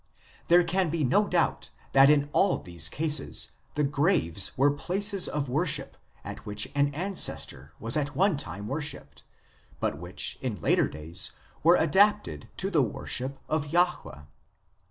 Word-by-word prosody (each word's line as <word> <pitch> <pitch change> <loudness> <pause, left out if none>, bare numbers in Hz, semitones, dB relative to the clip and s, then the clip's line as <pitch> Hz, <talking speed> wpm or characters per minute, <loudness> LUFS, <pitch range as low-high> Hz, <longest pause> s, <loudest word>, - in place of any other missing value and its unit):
There 175 +1 +6
can 180 +1 0
be 160 0 -1
no 200 +11 +2
doubt 175 -2 0 0.2
that 135 +1 +6
in 145 -1 +3
all 195 - +3
these 85 -2 -2
cases 155 0 0 0.2
the 150 - +1
graves 140 - +1
were 140 +2 +4
places 195 +6 0
of 145 -1 -3
worship 150 +1 -1 0.3
at - - -8
which 105 +1 -1
an 145 0 +1
ancestor 160 - -1
was 115 +1 0
at 145 -1 -2
one 195 -1 +3
time 100 -5 -6
worshipped, 150 +4 -5 0.6
but - - -2
which - - -4
in - - -4
later - - +2
days 80 +4 -2 0.3
were 170 +3 +6
adapted 205 +7 +2
to 195 +1 -2
the 155 - +3
worship 130 +3 -3
of 155 -1 -1
Jahwe. 175 - -1
150 Hz, 150 wpm, -27 LUFS, 125-175 Hz, 0.6 s, There